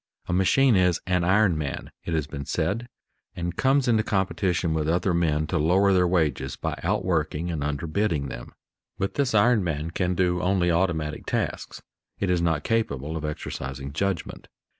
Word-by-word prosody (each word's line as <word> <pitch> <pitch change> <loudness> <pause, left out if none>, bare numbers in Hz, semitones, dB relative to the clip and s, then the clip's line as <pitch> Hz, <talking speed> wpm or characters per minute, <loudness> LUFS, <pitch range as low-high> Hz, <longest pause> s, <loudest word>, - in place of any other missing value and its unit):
A - - -2
machine 115 +7 +4
is 90 -2 +3
"an 90 -1 +1
iron 95 0 +3
man," 70 -2 -4
it 85 - -1
has 80 -3 0
been 70 -2 -7
said, 115 +5 -1 0.5
and 85 0 -3
comes 135 +3 +2
into 115 -3 +4
competition 90 -4 0
with 80 -1 0
other 90 +2 +1
men 80 -3 +1
to 80 +2 -1
lower 95 +6 +3
their 90 -1 +4
wages 75 -7 0
by - - -3
outworking 85 -2 -1
and 80 -3 -3
underbidding 75 +2 -1
them. - - -9 0.4
But 95 0 -2
this 135 -5 0
iron 110 0 +4
man 80 -1 -2
can 90 +1 -1
do 90 -1 +1
only 90 -1 +2
automatic 85 -4 -1
tasks; - - -3 0.3
it 100 -2 0
is 90 -1 +2
not 80 -3 +1
capable 80 - -1
of 80 - -4
exercising 70 -2 -5
judgment. 95 +2 -3
85 Hz, 170 wpm, -25 LUFS, 75-95 Hz, 0.5 s, machine